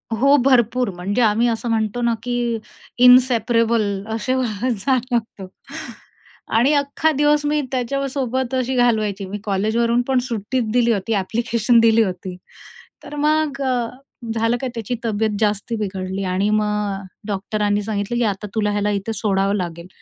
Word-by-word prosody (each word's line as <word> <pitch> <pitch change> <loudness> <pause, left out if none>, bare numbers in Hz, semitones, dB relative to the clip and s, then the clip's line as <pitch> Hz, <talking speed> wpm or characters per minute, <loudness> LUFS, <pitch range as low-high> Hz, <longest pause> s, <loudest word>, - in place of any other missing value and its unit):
हो, 275 +5 +4
भरपूर. 250 -2 +3
म्हणजे 195 +7 -1
आम्ही 225 +1 +3
असं 235 0 -2
म्हणतो 220 +1 -1
ना, 235 -1 +2
की 240 -1 -1 0.5
"इनसेपरेबल 235 -2 +5 0.3
असे 230 +4 -1 0.4
झालं 250 +2 0 0.2
होत." 190 -1 -8 1.1
आणि 260 +6 +4
अख्खा 285 +2 +1
दिवस 295 0 +2
मी 300 0 +1
त्याच्यासोबत 260 0 -2
अशी 255 0 -1
घालवायची. 215 -5 +1
मी 195 +2 -5
कॉलेजवरून 220 +4 +1
पण 265 -1 +2
सुट्टीच 225 +1 -2
दिली 240 -1 +3
होती, 210 +2 -2
ॲप्लिकेशन 230 +3 +1
दिली 225 0 +5
होती. 185 -2 -5 0.7
तर - - -9
मग 300 -1 +1
अ, 250 -3 0 0.5
झालं 230 +1 +1
काय, 260 - -2
त्याची 230 +1 -3
तब्येत 215 -1 0
जास्ती 210 +2 0
बिघडली 190 -2 -4
आणि 195 +2 +1
मग 215 0 +2 0.4
अ, - - -10 0.2
डॉक्टरांनी 205 0 -1
सांगितलं, 205 +2 -3
की 240 - +2
"आता 205 -1 -2
तुला 210 -2 +1
याला 205 0 0
इथे 225 +4 -4
सोडावं 195 -1 0
लागेल." 170 -2 -5
230 Hz, 145 wpm, -20 LUFS, 205-250 Hz, 1.1 s, इनसेपरेबल